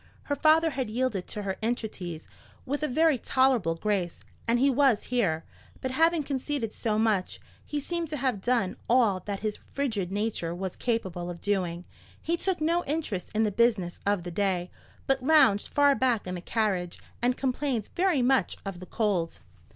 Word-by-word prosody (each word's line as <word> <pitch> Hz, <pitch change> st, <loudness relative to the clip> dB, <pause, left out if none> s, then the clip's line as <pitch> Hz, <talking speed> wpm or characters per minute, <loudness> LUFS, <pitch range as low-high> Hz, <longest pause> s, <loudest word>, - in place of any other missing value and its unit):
Her 285 Hz, -, -1 dB
father 320 Hz, +2 st, +4 dB
had 260 Hz, -5 st, -2 dB
yielded 225 Hz, -5 st, -1 dB
to 210 Hz, -, -5 dB
her 190 Hz, -1 st, -3 dB
entreaties 210 Hz, -8 st, -3 dB, 0.4 s
with 285 Hz, +3 st, -2 dB
a 305 Hz, -, +1 dB
very 310 Hz, 0 st, +3 dB
tolerable 250 Hz, -12 st, +2 dB
grace, 185 Hz, -1 st, -1 dB, 0.3 s
and 230 Hz, +1 st, +3 dB
he 265 Hz, +3 st, +4 dB
was 270 Hz, -4 st, +3 dB
here; 180 Hz, -11 st, 0 dB, 0.4 s
but 260 Hz, -, -3 dB
having 325 Hz, +3 st, +3 dB
conceded 275 Hz, -4 st, -2 dB
so 215 Hz, -2 st, -1 dB
much, 215 Hz, -4 st, +1 dB, 0.2 s
he 295 Hz, -, -3 dB
seemed 340 Hz, +3 st, -3 dB
to 300 Hz, 0 st, -4 dB
have 255 Hz, -7 st, -1 dB
done 235 Hz, -5 st, +1 dB
all 230 Hz, -6 st, +4 dB
that 200 Hz, -1 st, -3 dB
his 215 Hz, -1 st, -2 dB
frigid 220 Hz, -10 st, -3 dB
nature 200 Hz, -5 st, -2 dB
was 190 Hz, 0 st, -4 dB
capable 190 Hz, -7 st, -2 dB
of 175 Hz, -1 st, -6 dB
doing. 180 Hz, -3 st, -1 dB, 0.3 s
He 335 Hz, -, 0 dB
took 370 Hz, 0 st, -1 dB
no 335 Hz, +3 st, +1 dB
interest 280 Hz, -, -2 dB
in 220 Hz, -, +3 dB
the 210 Hz, -, +1 dB
business 210 Hz, -5 st, +1 dB
of 200 Hz, -3 st, +1 dB
the 175 Hz, -, -6 dB
day, 185 Hz, -1 st, 0 dB, 0.3 s
but 270 Hz, -1 st, +1 dB
lounged 255 Hz, -8 st, +5 dB
far 285 Hz, -1 st, +4 dB
back 250 Hz, -5 st, +1 dB
in 180 Hz, -, -4 dB
the 180 Hz, -, -5 dB
carriage, 185 Hz, -4 st, -1 dB, 0.2 s
and 245 Hz, +1 st, +2 dB
complained 260 Hz, -4 st, -1 dB
very 350 Hz, -8 st, +2 dB
much 265 Hz, +1 st, +2 dB
of 195 Hz, -3 st, -5 dB
the 185 Hz, -, -10 dB
cold. 195 Hz, -7 st, 0 dB
225 Hz, 180 wpm, -28 LUFS, 190-270 Hz, 0.4 s, lounged